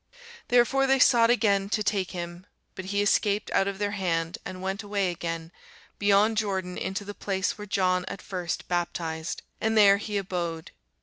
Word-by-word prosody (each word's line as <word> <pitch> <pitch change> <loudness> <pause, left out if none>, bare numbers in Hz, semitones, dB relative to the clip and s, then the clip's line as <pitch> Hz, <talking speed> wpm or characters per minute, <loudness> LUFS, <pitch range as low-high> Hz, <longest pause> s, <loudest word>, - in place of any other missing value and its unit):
Therefore 250 +3 +3
they 270 0 +4
sought 235 -3 +5
again 200 -5 +2
to 215 0 0
take 200 -3 0
him: 175 0 -7 0.3
but 190 - -7
he 200 +1 0
escaped 205 0 +1
out 195 - +2
of 200 -1 -3
their 205 0 -1
hand, 170 -4 -1
and 185 - -6
went 190 +2 -3
away 200 -3 -1
again 165 -1 -5 0.5
beyond 205 +2 +3
Jordan 190 -4 -1
into 195 +2 -4
the 205 - -6
place 195 -1 -2
where 210 0 -9
John 185 -2 +1
at - - -6
first 180 -2 -4
baptized; 165 -2 -3 0.2
and 220 0 +1
there 200 -2 +7
he 210 0 -3
abode. 175 -4 -4
195 Hz, 175 wpm, -27 LUFS, 180-205 Hz, 0.5 s, there